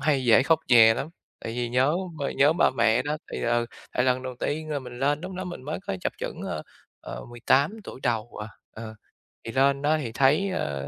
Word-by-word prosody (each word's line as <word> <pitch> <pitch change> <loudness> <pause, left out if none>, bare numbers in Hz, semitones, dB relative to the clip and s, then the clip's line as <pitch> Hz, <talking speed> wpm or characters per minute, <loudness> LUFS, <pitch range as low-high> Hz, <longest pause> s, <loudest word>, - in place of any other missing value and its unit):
hay 135 -2 +1
dễ 120 +2 +6
khóc 165 +3 +3
nhè 115 -2 +7
lắm, 135 +5 -4 0.4
tại 115 - -4
vì 120 0 -2
nhớ 130 +5 +2 0.2
b - - -5
nhớ 145 +3 +5
ba 175 - +3
mẹ 115 0 +2
đó, 150 +1 -2 0.2
thì, - - -4
ừ, 120 0 +1 0.3
tại 125 - +1
lần 130 0 +1
đầu 130 -1 -5
tiên 155 +1 -2
là 145 - -1
mình 125 -2 -9
lên 145 +2 +1
lúc 185 +1 -6
đó 185 - -4
mình 175 -7 -7
mới 155 - -3
có 95 - -2
chập - - -2
chững, - - -5
ơ, - - -4 0.4
ờ, - - -8
18 130 - +2
tuổi - - -9
đầu 120 -2 -2
à, 105 - -7 0.2
ờ. 110 0 -8 0.5
Thì 115 - -4
lên 135 +2 +2
đó 155 +2 +2
thì 130 -7 -4
thấy, 145 - +3
ờ, 70 - -3
130 Hz, 230 wpm, -26 LUFS, 120-150 Hz, 0.5 s, nhè